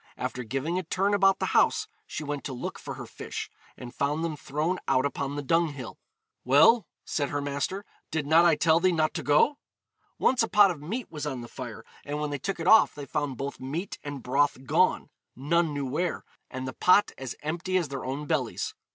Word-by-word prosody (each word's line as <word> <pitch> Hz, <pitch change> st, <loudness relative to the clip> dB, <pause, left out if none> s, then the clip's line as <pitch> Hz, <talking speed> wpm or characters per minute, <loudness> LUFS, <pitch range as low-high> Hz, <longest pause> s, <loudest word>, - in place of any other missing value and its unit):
After 125 Hz, -, -4 dB
giving 135 Hz, +10 st, -2 dB
a -, -, -4 dB
turn 195 Hz, +4 st, 0 dB
about 195 Hz, -1 st, +4 dB
the -, -, -1 dB
house, 435 Hz, -, +3 dB, 0.2 s
she -, -, -5 dB
went 145 Hz, -1 st, -4 dB
to 135 Hz, -, -4 dB
look 125 Hz, -, -5 dB
for -, -, -7 dB
her -, -, -7 dB
fish, -, -, -7 dB, 0.3 s
and 120 Hz, -1 st, -9 dB
found 150 Hz, +3 st, -1 dB
them 165 Hz, -2 st, -2 dB
thrown 155 Hz, +6 st, -2 dB
out 130 Hz, +2 st, +3 dB
upon 140 Hz, 0 st, -2 dB
the 145 Hz, -, -3 dB
dunghill. 145 Hz, -4 st, -1 dB, 0.4 s
'Well,' 145 Hz, -, +5 dB, 0.2 s
said 145 Hz, -3 st, -1 dB
her 145 Hz, -, -2 dB
master, 145 Hz, +8 st, -3 dB, 0.2 s
'did 160 Hz, -2 st, -2 dB
not 160 Hz, +3 st, +5 dB
I 170 Hz, -2 st, +5 dB
tell 160 Hz, +2 st, +4 dB
thee 185 Hz, +1 st, +3 dB
not 155 Hz, -2 st, +1 dB
to -, -, -3 dB
go?' 150 Hz, -, +3 dB, 0.6 s
Once 255 Hz, -1 st, +3 dB
a 225 Hz, -, +2 dB
pot 205 Hz, -2 st, +6 dB
of 155 Hz, -5 st, -7 dB
meat 215 Hz, +9 st, -5 dB
was 150 Hz, -2 st, -4 dB
on 130 Hz, -4 st, -4 dB
the 120 Hz, -, -8 dB
fire, 120 Hz, -3 st, -8 dB, 0.2 s
and 145 Hz, +1 st, -4 dB
when 150 Hz, -1 st, -2 dB
they 145 Hz, -, -3 dB
took 195 Hz, +7 st, -3 dB
it 165 Hz, -, -3 dB
off 220 Hz, +4 st, +6 dB
they 145 Hz, -2 st, -7 dB
found 145 Hz, -3 st, -2 dB
both 140 Hz, +2 st, -5 dB
meat 155 Hz, +9 st, -5 dB
and 145 Hz, -3 st, -6 dB
broth 135 Hz, 0 st, +1 dB
gone, -, -, +2 dB, 0.2 s
none 160 Hz, +5 st, +1 dB
knew 145 Hz, -1 st, -3 dB
where, 160 Hz, +7 st, -2 dB, 0.2 s
and 130 Hz, 0 st, -5 dB
the 130 Hz, -, -5 dB
pot 185 Hz, +3 st, +4 dB
as 130 Hz, -2 st, -5 dB
empty 175 Hz, +4 st, -1 dB
as 170 Hz, -6 st, -1 dB
their 135 Hz, -1 st, -5 dB
own 135 Hz, +3 st, -4 dB
bellies. 145 Hz, -7 st, -1 dB
150 Hz, 215 wpm, -27 LUFS, 135-175 Hz, 0.6 s, pot